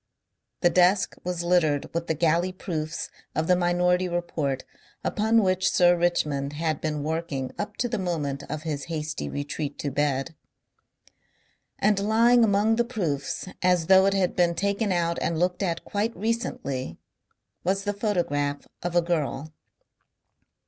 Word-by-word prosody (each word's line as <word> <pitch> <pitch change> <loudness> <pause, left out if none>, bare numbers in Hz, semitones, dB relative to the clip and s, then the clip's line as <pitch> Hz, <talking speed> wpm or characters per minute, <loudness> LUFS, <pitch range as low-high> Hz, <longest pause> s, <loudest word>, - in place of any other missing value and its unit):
The 175 - +4
desk 185 +2 +3
was 180 -1 -2
littered 165 -5 +1
with 170 0 -2
the 160 - 0
galley 170 +3 +2
proofs 160 -4 -4 0.2
of 155 - +1
the 180 - +4
Minority 180 +1 +2
Report 160 -6 -2 0.4
upon 220 +1 +2
which 185 -1 +2
Sir 175 0 +5
Richmond 150 -5 0
had 155 -1 -2
been 150 -2 -2
working 155 -4 -3
up 210 0 -4
to 245 - 0
the 230 -3 -2
moment 150 -7 -2
of 155 0 -4
his 150 -4 -3
hasty 155 -2 -4
retreat 145 0 -4
to 145 - -3
bed. 145 +2 0 1.4
And 205 0 +2
lying 230 +4 +4
among 215 +1 +3
the 235 - +3
proofs, 180 - -3
as 180 -2 +3
though 190 +2 +6
it 195 - +2
had 185 -2 +1
been 175 -1 +2
taken 200 +3 0
out 170 -1 0
and 165 - 0
looked 180 +2 0
at 170 -4 -2
quite 215 +3 -2
recently 215 - -3 0.7
was 195 +2 0
the 205 0 -1
photograph 155 -9 -1
of 175 0 -3
a 175 - +4
girl. 155 -3 -2
175 Hz, 150 wpm, -26 LUFS, 155-195 Hz, 1.4 s, though